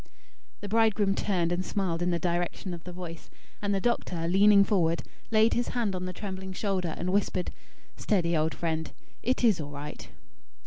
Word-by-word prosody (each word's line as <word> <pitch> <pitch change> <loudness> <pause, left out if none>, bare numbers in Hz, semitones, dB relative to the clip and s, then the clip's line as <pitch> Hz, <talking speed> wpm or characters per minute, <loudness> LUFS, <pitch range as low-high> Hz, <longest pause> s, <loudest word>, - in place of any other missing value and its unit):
The 205 - -5
bridegroom 215 -2 +3
turned 180 -4 0
and 175 +1 0
smiled 185 -4 -1
in 175 - +1
the 170 - +1
direction 175 +1 -2
of 170 -1 -8
the 180 - -6
voice; 175 -2 -8 0.3
and 205 -1 0
the 195 - +2
doctor, 180 -7 -1
leaning 200 +3 +6
forward, 170 -5 +1 0.3
laid 220 0 +4
his 240 - 0
hand 215 -5 0
on 180 0 -3
the 185 - -3
trembling 190 0 -6
shoulder, 185 -4 -1
and 185 +1 -2
whispered: 195 -2 0 0.5
"Steady, 175 -5 +1
old 160 +1 +1
friend. 160 -1 -2 0.3
It 255 +1 0
is 215 -8 +4
all 145 - -6
right." 145 +1 -8
185 Hz, 180 wpm, -28 LUFS, 170-205 Hz, 0.5 s, leaning